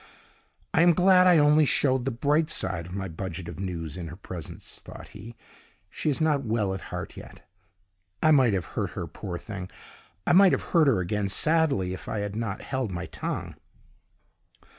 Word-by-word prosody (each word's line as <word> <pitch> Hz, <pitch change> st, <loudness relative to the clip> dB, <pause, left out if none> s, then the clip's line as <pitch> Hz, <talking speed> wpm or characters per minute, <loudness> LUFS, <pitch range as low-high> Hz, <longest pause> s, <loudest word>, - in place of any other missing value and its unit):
"I -, -, +4 dB
am 175 Hz, 0 st, +6 dB
glad 185 Hz, +1 st, +5 dB
I 175 Hz, -2 st, +6 dB
only 150 Hz, +1 st, +5 dB
showed 130 Hz, -3 st, +2 dB
the -, -, +1 dB
bright 145 Hz, +6 st, +1 dB
side 85 Hz, -, -2 dB
of 90 Hz, -, -8 dB
my 95 Hz, -1 st, -3 dB
budget 85 Hz, 0 st, -6 dB
of 85 Hz, 0 st, -8 dB
news 85 Hz, -5 st, -4 dB
in 85 Hz, -2 st, -5 dB
her 80 Hz, -, -8 dB
presence," 90 Hz, -3 st, -8 dB
thought -, -, -11 dB
he. 110 Hz, +3 st, -11 dB, 0.6 s
"She 155 Hz, -, -2 dB
is 140 Hz, -, 0 dB
not 150 Hz, -3 st, +2 dB
well 110 Hz, -4 st, 0 dB
at 95 Hz, -, -5 dB
heart -, -, -6 dB
yet. -, -, -13 dB, 0.8 s
I 155 Hz, -, +6 dB
might 130 Hz, -7 st, +5 dB
have 90 Hz, -3 st, -2 dB
hurt -, -, -1 dB
her, -, -, -2 dB
poor 90 Hz, -2 st, -6 dB
thing! 95 Hz, 0 st, -7 dB, 0.6 s
I -, -, +3 dB
might 190 Hz, 0 st, +7 dB
have -, -, 0 dB
hurt 165 Hz, -4 st, +5 dB
her 115 Hz, -9 st, +3 dB
again 100 Hz, +3 st, -1 dB
sadly, 145 Hz, -, +1 dB
if 95 Hz, -, -8 dB
I 110 Hz, -2 st, -2 dB
had 100 Hz, 0 st, -4 dB
not 110 Hz, -3 st, -4 dB
held 130 Hz, -4 st, -2 dB
my 90 Hz, -1 st, -4 dB
tongue!" -, -, -5 dB
110 Hz, 190 wpm, -26 LUFS, 95-150 Hz, 0.8 s, might